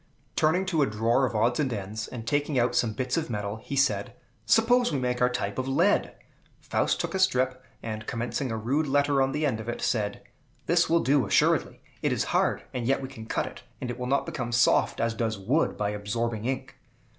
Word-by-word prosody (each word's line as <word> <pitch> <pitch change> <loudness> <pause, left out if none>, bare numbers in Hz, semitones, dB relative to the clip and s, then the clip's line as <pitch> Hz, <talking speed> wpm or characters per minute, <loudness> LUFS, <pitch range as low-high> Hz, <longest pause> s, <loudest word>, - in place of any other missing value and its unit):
Turning 180 +5 +2
to 170 -5 +1
a 140 - +3
drawer 115 +5 +2
of 120 - -6
odds 120 +5 +2
and 135 -4 +1
ends, 110 +1 -4
and 115 -3 -7
taking 145 +2 0
out 120 0 +2
some 115 - +2
bits 125 +5 -2
of 160 -4 -2
metal, 105 -1 -3
he 125 +5 -6
said, 120 -8 +1 0.3
"Suppose 240 - +4
we 145 - 0
make 125 -1 -1
our 125 - +5
type 125 -3 -3
of 130 - -2
lead!" 170 +10 +2 0.4
Faust - - 0
took - - -2
up - - -5
a - - -3
strip, 130 -8 +1 0.2
and, 110 -1 -5
commencing 125 +3 -2
a 110 - -2
rude 135 +8 0
letter 140 0 +2
on 135 0 +2
the 150 +2 -1
end 125 -6 0
of 110 +1 -6
it, 120 - -3
said, 105 -4 -1 0.4
"This 175 +1 +3
will 165 0 +4
do, 140 0 +2
assuredly. - - +2 0.2
It - - +1
is - - +1
hard, - - +1
and 120 -2 -3
yet 135 0 +1
we 130 - -5
can 115 -5 -10
cut - - -1
it, - - -9 0.2
and 125 -3 -3
it 120 - -7
will 125 - -3
not 140 +2 +1
become 120 -4 -4
soft, 115 -2 +3
as 115 0 +1
does 110 -1 -2
wood, 125 +12 0
by 105 0 -1
absorbing 110 +2 -3
ink." 130 +1 -4
125 Hz, 225 wpm, -27 LUFS, 110-140 Hz, 0.4 s, our